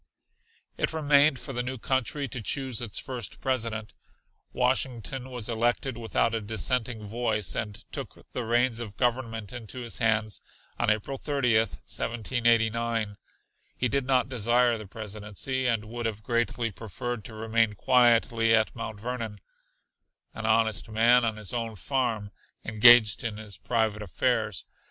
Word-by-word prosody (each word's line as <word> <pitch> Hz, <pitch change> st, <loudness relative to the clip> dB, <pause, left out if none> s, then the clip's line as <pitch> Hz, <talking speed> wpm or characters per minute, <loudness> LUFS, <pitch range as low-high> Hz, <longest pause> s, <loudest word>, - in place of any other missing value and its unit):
It -, -, +1 dB
remained 145 Hz, -2 st, +4 dB
for 135 Hz, -, -7 dB
the 125 Hz, -, -1 dB
new 130 Hz, +1 st, -4 dB
country 135 Hz, +3 st, -1 dB
to 120 Hz, -, -4 dB
choose 130 Hz, 0 st, -1 dB
its 115 Hz, -4 st, -3 dB
first 130 Hz, -3 st, -4 dB
President. 115 Hz, -4 st, -2 dB, 0.6 s
Washington 130 Hz, 0 st, -1 dB
was 125 Hz, -4 st, -5 dB
elected 120 Hz, +2 st, 0 dB
without 115 Hz, 0 st, 0 dB
a 115 Hz, -, -1 dB
dissenting 110 Hz, +2 st, -1 dB
voice, 110 Hz, -1 st, -1 dB
and 105 Hz, -3 st, -3 dB, 0.2 s
took -, -, -7 dB
the 125 Hz, -, -3 dB
reins 120 Hz, +1 st, +2 dB
of 105 Hz, -4 st, -7 dB
government 115 Hz, -4 st, -1 dB
into 120 Hz, +2 st, -6 dB
his 120 Hz, -1 st, -4 dB
hands 110 Hz, -3 st, +1 dB, 0.4 s
on 120 Hz, -, +2 dB
April 110 Hz, +5 st, -1 dB
30, 140 Hz, -6 st, +1 dB
1789. 115 Hz, 0 st, 0 dB, 0.6 s
He 125 Hz, -, +1 dB
did 135 Hz, +1 st, -1 dB
not 130 Hz, -2 st, +3 dB
desire 120 Hz, 0 st, +3 dB
the 110 Hz, -2 st, -8 dB
Presidency, 110 Hz, +5 st, -3 dB
and 115 Hz, -3 st, 0 dB
would 120 Hz, +1 st, -3 dB
have 105 Hz, -1 st, -5 dB
greatly 115 Hz, 0 st, 0 dB
preferred 110 Hz, +3 st, -5 dB
to 110 Hz, -, -8 dB
remain 115 Hz, 0 st, +1 dB
quietly 115 Hz, -1 st, +4 dB
at 110 Hz, -1 st, +1 dB
Mount 110 Hz, -2 st, -6 dB
Vernon, 115 Hz, -2 st, -4 dB, 0.9 s
"an 115 Hz, -1 st, -4 dB
honest 110 Hz, 0 st, +2 dB
man 120 Hz, +3 st, +5 dB
on 110 Hz, -2 st, -1 dB
his 105 Hz, 0 st, -4 dB
own 115 Hz, -2 st, -2 dB
farm," 115 Hz, -3 st, -1 dB, 0.3 s
engaged 110 Hz, -1 st, +7 dB
in 110 Hz, -3 st, -3 dB
his 105 Hz, -3 st, -7 dB
private 110 Hz, +2 st, 0 dB
affairs. 100 Hz, -4 st, -1 dB
115 Hz, 145 wpm, -27 LUFS, 110-125 Hz, 0.9 s, engaged